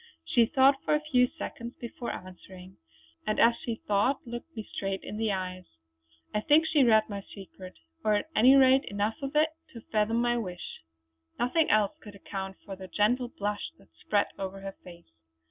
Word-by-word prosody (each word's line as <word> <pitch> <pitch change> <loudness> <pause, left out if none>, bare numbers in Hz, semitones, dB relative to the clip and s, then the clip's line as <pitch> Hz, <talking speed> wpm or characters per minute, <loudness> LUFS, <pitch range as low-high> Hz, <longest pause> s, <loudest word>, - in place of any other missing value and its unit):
She 235 -2 +3
thought 270 0 +4
for - - +2
a - - +2
few 250 -1 +5
seconds 235 0 -7
before 235 0 -6
answering, 185 0 -11 0.5
and 215 - 0
as 235 - +6
she 235 - -2
thought 210 +7 +1
looked 240 +7 -8
me 220 - -3
straight 195 -1 -3
in 210 - -6
the 220 -1 0
eyes. 185 -1 -4 0.7
I 210 - 0
think 305 +6 +4
she 305 -3 +4
read 220 -3 +5
my 200 -2 -5
secret, 190 -2 -12 0.3
or 215 -1 +3
at 310 +10 -2
any 255 +5 +7
rate 265 0 +6
enough 205 +7 -2
of 275 +1 -5
it 310 +1 +4 0.2
to 230 - -9
fathom 220 +1 +2
my 240 0 +1
wish; 180 -5 -7 0.6
nothing 305 +7 +2
else 210 -1 +3
could 205 -2 -11
account 195 -1 -6
for 195 - -6
the 190 0 -9
gentle 235 +7 +1
blush 205 -3 -3
that - - -22
spread 205 - 0
over 195 0 -5
her 195 0 -6
face. 170 -1 -13
215 Hz, 185 wpm, -29 LUFS, 195-250 Hz, 0.7 s, any